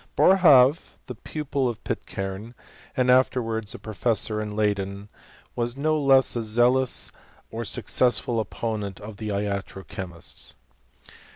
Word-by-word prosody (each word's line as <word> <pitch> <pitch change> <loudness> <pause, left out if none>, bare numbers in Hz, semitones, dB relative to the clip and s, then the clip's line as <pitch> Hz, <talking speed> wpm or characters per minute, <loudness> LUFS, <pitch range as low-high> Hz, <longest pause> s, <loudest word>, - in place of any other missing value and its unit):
Boerhaave, 150 -7 +5
the 125 - -6
pupil 140 +1 -2
of 115 - -7
Pitcairne, 95 +5 -5 0.4
and 125 -1 +4
afterwards 115 -4 +1
a - - -6
professor 110 0 -1
in 105 -1 -5
Leyden, 100 -1 -1 0.5
was 120 0 -1
a - - -12
no 155 +2 +2
less 135 -1 +5
zealous 120 +4 +2 0.4
or 115 +1 -4
success 125 +1 +2
ftil 120 -4 -2
opponent 105 -2 -4
of 105 0 -9
the 110 - -5
iatro 100 -1 -3
chemists. 90 -3 -7
115 Hz, 125 wpm, -25 LUFS, 105-130 Hz, 0.5 s, Boerhaave